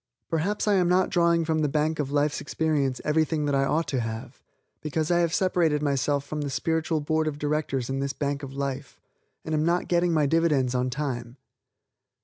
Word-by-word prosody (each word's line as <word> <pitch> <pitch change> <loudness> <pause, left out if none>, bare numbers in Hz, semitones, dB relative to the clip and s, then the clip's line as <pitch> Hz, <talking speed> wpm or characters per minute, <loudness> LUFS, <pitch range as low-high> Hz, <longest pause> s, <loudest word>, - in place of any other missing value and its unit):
Perhaps 185 +7 0
I 210 - +4
am 180 -3 +3
not 185 +1 +3
drawing 170 -1 +3
from 160 0 0
the 150 -2 +1
bank 155 +2 0
of 140 -3 -1
life's 145 0 +1
experience 145 -4 0
everything 155 0 +1
that 145 - 0
I 135 0 +2
ought 160 +4 0
to 135 - 0
have 110 -1 -6 0.4
because 155 +1 -1
I 175 - +4
have 170 -2 +2
separated 165 -5 +1
myself 140 0 0
from 150 +1 -4
the 145 - -2
spiritual 160 +2 -1
board 155 +1 0
of 150 -2 -2
directors 145 -4 -1
in 135 0 -2
this 140 0 -1
bank 140 0 -2
of 140 -2 -7
life, 140 0 -4 0.5
and 155 - -3
am 155 0 +2
not 170 +2 +1
getting 175 0 +2
my 155 -3 +3
dividends 145 -5 +2
on 125 0 0
time. 125 -3 -4
150 Hz, 200 wpm, -26 LUFS, 140-160 Hz, 0.5 s, I